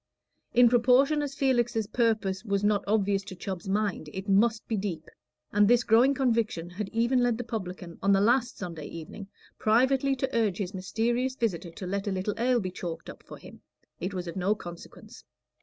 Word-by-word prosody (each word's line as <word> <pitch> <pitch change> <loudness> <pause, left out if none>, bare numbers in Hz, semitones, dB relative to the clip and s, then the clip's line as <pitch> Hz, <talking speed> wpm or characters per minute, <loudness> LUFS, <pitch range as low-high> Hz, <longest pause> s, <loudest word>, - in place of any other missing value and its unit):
In 245 0 +7
proportion 250 +5 +4
as 280 -2 -4
Felix's 240 -5 +1
purpose 215 -4 0
was 200 -3 -1
not 205 -1 +2
obvious 200 -2 +1
to 195 -2 -8
Chubb's 190 +1 -6
mind, 200 -6 -1
it 190 +2 -6
must 215 +3 +2
be 225 - -1
deep; 190 -6 -4 0.5
and 205 0 +5
this 245 +1 +4
growing 245 +6 +4
conviction 225 -10 0
had 195 +2 -5
even 235 +3 +1
led 245 -2 +2
the 245 - -4
publican 185 -6 -6
on 200 - +3
the 195 - +5
last 240 +4 +2
Sunday 165 -5 -6
evening 170 +5 -9 0.3
privately 260 +5 +3
to 265 0 -3
urge 215 -5 +1
his 195 -2 -4
mysterious 235 +7 -1
visitor 190 -9 -2
to 175 +3 -8
let 200 +2 -3
a - - 0
little 190 +2 -2
ale 245 +1 +3
be 185 -4 -4
chalked 175 -2 -6
up - - -15
for - - -11
him - - -14 0.4
it 185 +4 -3
was 180 -2 -4
of 170 - -6
no 195 +3 +1
consequence. 175 -4 -11
210 Hz, 190 wpm, -28 LUFS, 190-240 Hz, 0.5 s, In